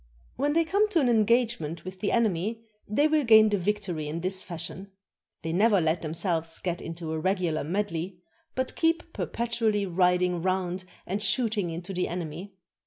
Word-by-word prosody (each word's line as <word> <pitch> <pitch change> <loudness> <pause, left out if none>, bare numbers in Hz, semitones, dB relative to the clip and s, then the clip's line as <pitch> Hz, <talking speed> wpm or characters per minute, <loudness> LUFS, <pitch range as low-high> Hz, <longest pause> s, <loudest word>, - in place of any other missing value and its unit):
When 290 +3 0
they 330 +1 +4
come 405 +6 +2
to 350 - +2
an 270 - +2
engagement 220 -8 +1
with 185 0 -7
the 205 - 0
enemy, 220 0 0 0.2
they 285 +9 +3
will 305 -1 +2
gain 220 -2 +7
the 205 - +1
victory 185 -5 -2
in 160 +3 -4
this 185 +1 +1
fashion: 175 +3 -6 0.5
They 165 0 -2
never 205 +2 +4
let 160 0 +1
themselves 165 0 -1
get 175 -2 -3
into 165 -1 -6
a 160 - -2
regular 180 -3 0
medley, 180 +1 -2 0.4
but 260 0 -2
keep 330 0 0
per - - -3
petually 230 -3 0
riding 180 0 +2
round 185 0 -1 0.2
and 195 +3 -2
shooting 215 -2 +2
into 175 +4 -6
the 180 0 0
enemy. 175 +3 -6
190 Hz, 175 wpm, -27 LUFS, 170-225 Hz, 0.5 s, gain